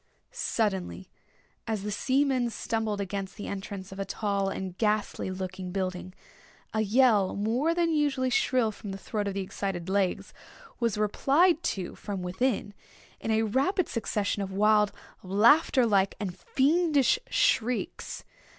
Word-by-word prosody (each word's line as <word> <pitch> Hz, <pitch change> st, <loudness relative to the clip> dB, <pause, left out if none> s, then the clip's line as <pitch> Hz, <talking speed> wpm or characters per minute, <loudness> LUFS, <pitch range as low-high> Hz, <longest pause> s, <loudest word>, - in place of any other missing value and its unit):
Suddenly, 195 Hz, -4 st, -2 dB, 0.6 s
as 215 Hz, -3 st, -2 dB
the 210 Hz, -, -3 dB
seamen 260 Hz, +2 st, +1 dB
stumbled 220 Hz, -2 st, -2 dB
against 195 Hz, 0 st, -4 dB
the 205 Hz, -, -6 dB
entrance 195 Hz, -1 st, -6 dB
of 195 Hz, -, -9 dB
a -, -, 0 dB
tall 200 Hz, -1 st, -1 dB
and 190 Hz, -2 st, -5 dB
ghastly 210 Hz, -3 st, 0 dB
looking 185 Hz, 0 st, -5 dB
building, 185 Hz, -1 st, -3 dB, 0.6 s
a 220 Hz, -, +1 dB
yell 215 Hz, -3 st, +3 dB
more 245 Hz, +11 st, +1 dB
than 340 Hz, -1 st, +2 dB
usually 275 Hz, -4 st, +1 dB
shrill 245 Hz, -3 st, +2 dB
from 205 Hz, 0 st, -9 dB
the -, -, -5 dB
throat 205 Hz, +1 st, -3 dB
of 195 Hz, -, -3 dB
the 195 Hz, -, -1 dB
excited 190 Hz, -2 st, -4 dB
Legs, 195 Hz, -1 st, 0 dB, 0.5 s
was 230 Hz, -4 st, 0 dB
replied 290 Hz, -, +3 dB, 0.2 s
to 180 Hz, -2 st, -5 dB
from 195 Hz, -3 st, -5 dB
within, 205 Hz, +3 st, -1 dB, 0.5 s
in -, -, -5 dB
a 220 Hz, 0 st, +3 dB
rapid 275 Hz, -, +1 dB
succession 210 Hz, -3 st, -1 dB
of 195 Hz, -1 st, -4 dB
wild, 210 Hz, +1 st, +3 dB, 0.3 s
laughter 235 Hz, -, +4 dB
like, 200 Hz, -3 st, +2 dB
and 190 Hz, -4 st, -4 dB
fiendish 295 Hz, -, +2 dB
shrieks. 250 Hz, -, 0 dB
210 Hz, 140 wpm, -28 LUFS, 195-255 Hz, 0.6 s, laughter